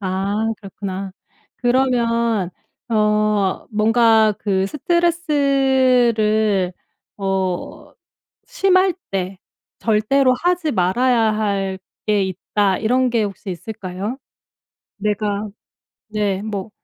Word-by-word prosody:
아 195 +1 -2 0.2
그렇구나. 195 -1 -6 0.4
그러면 235 -5 +1 0.4
어 210 -3 +1
뭔가 220 0 +4
그 195 -2 0
스트레스를 260 - +2 0.4
어 195 +8 -3 0.5
심할 380 -6 +2 0.2
때 190 -1 -3 0.4
절대로 255 +4 +2
하지 350 -4 +1
말아야 235 +8 +2 0.2
할 195 -3 -1 0.3
게 210 -2 +2
있다. 190 +1 0
이런 250 +3 +2
게 230 -2 +1
혹시 200 0 -6
있을까요? 195 +4 -5 0.8
내가 210 0 -1 0.6
네 205 -3 -1
뭐 210 -1 -5
215 Hz, 165 characters per minute, -20 LUFS, 195-250 Hz, 0.8 s, 뭔가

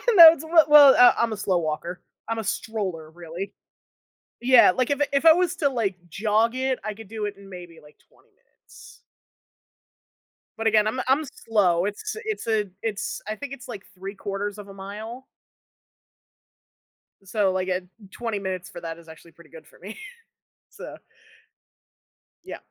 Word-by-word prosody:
No. 330 -3 +11
It's 320 -2 -9
we 320 - -11 0.2
well, 290 -2 +8
uh, 245 - +7
I'm 230 -1 0
a - - -6
slow 195 -2 0
walker. 170 +2 -4 0.3
I'm 225 0 -3
a - - -4
stroller, 195 -6 -4
really. 175 +4 -8 0.9
Yeah. 250 -4 +6
Like, 255 +6 -1
if 285 0 -1
i - - +4
if 280 +3 +1
I 325 - +9
was 360 +1 0
to, 290 -5 +1
like, 225 -8 -2
jog 220 +6 0
it, 260 0 -1
I 215 - -4
could 220 0 -13
do 215 0 -5
it 205 0 -5
in 200 -1 -15
maybe, 175 -3 -11
like, 150 0 -20
20 - - -29
minutes. - - -19 1.6
But, 225 0 -1
again, 215 -1 +3
I'm 220 +4 -2
I'm 270 +4 +2 0.2
slow. 185 -6 +2
It's 210 - -5
it's 430 - -4
a 220 -2 +1 0.2
it's 215 -3 -4
I 215 - -3
think 280 +3 -8
it's 255 -3 -11
like 210 -5 -8
3/4 195 +2 -5
of 205 -1 -10
a 195 - -11
mile. 215 +6 -9 2.0
So, 195 0 0
like 185 0 -2
at 185 0 -1 0.3
20 230 -4 -4
minutes 185 -2 -5
for 175 - -10
that 165 -1 -6
is 170 -1 -17
actually 160 +1 -15
pretty 165 0 -19
good 160 - -14
for - - -21
me. 205 +4 -10 0.7
So - - -10 1.5
Yeah. - - -8
210 Hz, 170 wpm, -24 LUFS, 185-240 Hz, 2.0 s, No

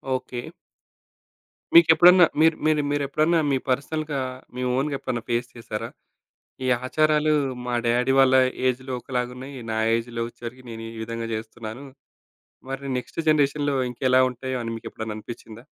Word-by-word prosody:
Okay. 125 -1 -6 1.2
మీకెప్పుడన్నా 175 +2 +8
మీరు 160 0 +5
మీరు 155 -1 +3
మీరెప్పుడన్నా 155 +4 +1
మీ 135 - +3
పర్సనల్‌గా, 145 +2 -1 0.4
మీ 125 - -4
ఓనుగెప్పుడన్నా 135 -4 -2
ఫేస్ 120 0 0
చేసారా? 110 -2 -5 0.8
ఈ - - 0 0.2
ఆచారాలు 155 +2 +2 0.3
మా 125 - -1
డ్యాడీ 125 +3 +2
వాళ్ళ 130 -1 +6 0.3
ఏజ్‌లో 130 +1 -1
ఒకలాగున్నయి. 125 +2 -4
నా 110 - -1 0.2
ఏజ్‌లో 115 0 -2
ఒచ్చేవరికి 120 +2 -10
నేనీవిధంగా 115 0 -6
జేస్తున్నాను. 110 +3 -7 0.9
మరి 135 +1 -5
నెక్స్ట్ 125 - -5
జనరేషన్‌లో 145 -1 +2
ఇంకెలా 130 +1 +2
ఉంటాయో 130 +1 -4
అని 115 0 -4
మీకెప్పుడన్నా 110 -1 -6
అనిపిచ్చిందా? 115 +1 -10
130 Hz, 120 wpm, -24 LUFS, 115-145 Hz, 1.2 s, మీకెప్పుడన్నా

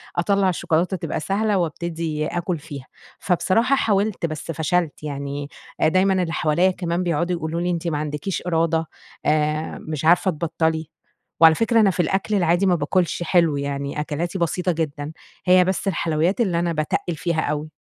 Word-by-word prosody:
أطلّع 195 +2 +2
الشوكولاتة 175 +2 0
تبقى - - -3
سهلة 205 +5 0
وأبتدي 165 -2 -2
آكل 175 -1 -2
فيها. 145 -4 -9 0.3
فبصراحة 220 +9 +2
حاولت، 205 -6 +1
بس 155 0 -4
فشلت، 160 0 -1
يعني 140 0 -4 0.3
دايمًا 185 +3 +3
اللي 165 -1 -2
حواليَّ 175 +4 +2
كمان 175 -1 -2
بيقعدوا 175 +1 0
يقولوا 165 0 -3
لي: 175 - 0
"أنتِ 170 -1 -2
ما 155 - 0
عندكيش 150 +4 -3
إرادة، 165 -1 +1 0.4
آآ، 150 +1 0
مش 155 -1 -3
عارفة 180 +3 +4
تبطَّلي." 160 -1 -1 0.5
وعلى 160 -1 +8
فكرة 230 0 +2
أنا 210 -3 +5
في 180 - -8
الأكل 195 +5 0
العادي 175 0 +2
ما 180 - +4
باكلش 175 +3 0
حلو، 170 -4 +3
يعني 140 +1 -3
أكلاتي 165 +5 -3
بسيطة 180 +2 0
جدًا. 150 -2 -3 0.3
هي 180 0 +6
بس 190 +1 -1
الحلويّات 170 +3 +1
اللي 180 -7 +1
أنا 170 -1 0
باتَقّل 155 +2 -1
فيها 170 0 -1
أوي. 150 +1 -2
170 Hz, 160 wpm, -22 LUFS, 155-180 Hz, 0.5 s, وعلى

